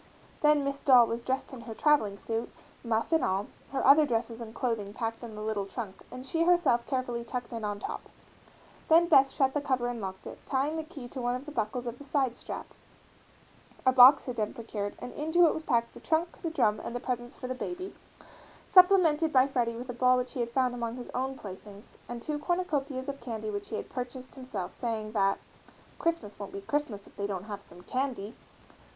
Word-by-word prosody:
Then 300 -1 +5
Miss 280 0 -2
Doll 250 -3 +7
was 230 +1 -3
dressed 260 +2 -2
in 250 - -8
her 225 -1 -8
travelling 220 -10 +3
suit, 225 +2 -3 0.3
muff 230 +2 0
and 320 -4 +3
all, 190 +2 +1 0.3
her 275 - -1
other 285 +3 +8
dresses 230 -3 -1
and 225 -1 -7
clothing 215 -5 -2
packed 225 0 -3
in 225 -2 -7
the 210 - -6
little 210 -2 -2
trunk, 200 -3 -6
and 255 +1 -8
she 325 +5 +1
herself 345 -9 +3
carefully 245 -3 -2
tucked 245 0 -5
in 230 -1 -4
on 205 -1 -2
top, - - -6 0.8
then 330 +2 +6
Beth 270 -4 +6
shut 270 -1 +1
the 295 - 0
cover 260 -3 0
and 240 -2 -4
locked 190 -1 -6
it, - - -9
tying 280 +3 0
the 320 - -2
key 305 -6 -9
to 260 - -6
one 245 0 0
of 255 +3 -6
the 300 - -7
buckles 240 -1 -2
of 240 0 -5
the - - -9
side 270 -4 0
strap - - -6 1.2
a 260 - +6
box 255 +2 +8
had 250 - -4
been 215 +2 -1
procured 210 -4 -4
and - - -8
into 320 +4 +3
it 320 - +4
was 320 - -4
packed 235 -6 0
the - - -11
trunk, 330 +2 -1
the 335 - -1
drum, 215 -10 +2
and 235 - -6
the - - -1
presents 245 -1 -4
for - - -8
the 255 - -2
baby, 360 +8 -5 0.7
supplemented 360 -5 +6
by 260 -2 +6
Freddie 245 -4 0
with 245 +2 -6
a - - -7
ball 255 +1 +4
which 250 0 -2
he 265 - -5
had 235 -1 0
found 255 0 +1
among 235 -1 -3
his 245 - -8
own 265 +1 -2
playthings 200 0 -11
and 240 -1 -6
two 300 -1 -2
cornucopias 295 -6 -1
of 280 -1 -5
candy 220 -3 -4
which 205 0 -5
he 220 - -3
had - - -4
purchased 255 0 -6
himself, 255 -9 -6
saying 220 -3 -3
that 195 -2 +2 0.6
"Christmas 330 -13 -1
won't 200 - -7
be 200 - -5
Christmas 235 -4 -2
if - - -19
they 200 - -1
don't 190 -3 -4
have 205 -1 -6
some 180 -2 -15
candy." 250 -3 -3
245 Hz, 220 wpm, -29 LUFS, 225-280 Hz, 1.2 s, other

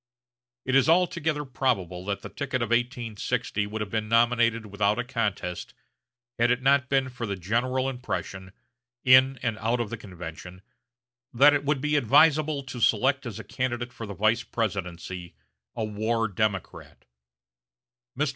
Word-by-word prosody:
It 130 - -1
is 135 +1 +4
altogether 165 -3 +1
probable 100 -10 -1
that 100 -1 -3
the - - -7
ticket 130 -4 -3
of 115 - -3
1860 120 -2 -1
would 110 +1 -5
have 105 -2 -4
been 110 -1 -2
nominated 115 -1 +3
without 100 0 0
a 125 - -1
contest 110 -8 -3 0.6
had 120 +1 +4
it 125 +1 +1
not 135 -1 +3
been 135 -1 +2
for 120 -2 -5
the 100 - -2
general 120 +8 -1
impression, 95 -7 -5 0.5
in 130 +1 +6
and 115 -3 -1
out 115 +3 0
of 115 -3 -3
the 115 - -4
convention, 90 -2 -10 0.7
that 140 +5 +6
it 145 -1 0
would 145 -2 0
be 150 +1 +1
advisable 150 +3 +4
to 130 -2 -7
select 120 +4 +2
as 110 -3 -6
a 115 - -7
candidate 125 -1 -3
for 115 - -7
the 100 - -7
vice 110 +5 +2
presidency 90 -6 -4 0.4
a 115 - -2
war 110 +2 -1
Democrat. 100 -2 -3 1.1
Mr. 150 +1 +1
115 Hz, 155 wpm, -26 LUFS, 105-130 Hz, 1.1 s, in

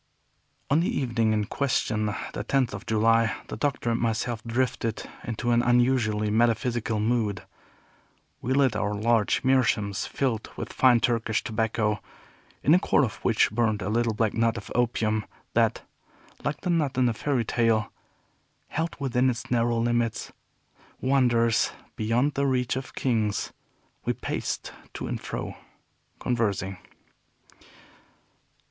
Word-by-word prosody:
On 145 - +5
the 170 - +1
evening 115 -4 +1
in 105 -1 +1
question, 110 -4 0 0.3
the 105 - -3
tenth 130 0 +1
of 100 +2 -7
July, 115 +1 +3
the - - -4
Doctor 125 -1 -1
and 115 - 0
myself 115 0 -1
drifted 115 -2 -1 0.2
into 120 +1 -2
an 120 0 +4
unusually 120 -4 +2
metaphysical 115 0 +1
mood. 105 -4 0 1.0
We 130 - 0
lit 135 -3 +3
our 105 0 -1
large 110 0 +2
meerschaums, 115 -6 +2
filled 120 -5 -1
with - - -5
fine 125 -3 +5
Turkish 115 -3 +1
tobacco, 110 -2 0 0.6
in 145 - +4
the 175 - +7
core 145 - +3
of 110 - -6
which 115 -3 +2
burned 110 -2 +1
a 95 - -2
little 115 0 +1
black 110 -1 +1
nut 115 0 +1
of 105 - -8
opium, 110 -3 +1 0.3
that, - - +2 0.6
like 145 0 -2
the 180 - 0
nut 150 -6 0
in 130 - +4
the 120 - +2
fairy 125 +1 -1
tale, 115 -2 +1 0.8
held 165 +2 -2
within 130 -2 +1
its 120 -1 -4
narrow 120 -1 +2
limits 120 -1 0 0.7
wonders 120 -4 +2 0.2
beyond 120 +7 +1
the 140 0 +1
reach 125 -2 +1
of 130 0 -6
kings; 110 -5 0 0.5
we - - 0
paced - - -4 0.2
to - - -4
and - - -4
fro, - - -5 0.6
conversing. 100 -6 -1
115 Hz, 140 wpm, -26 LUFS, 110-125 Hz, 1.0 s, the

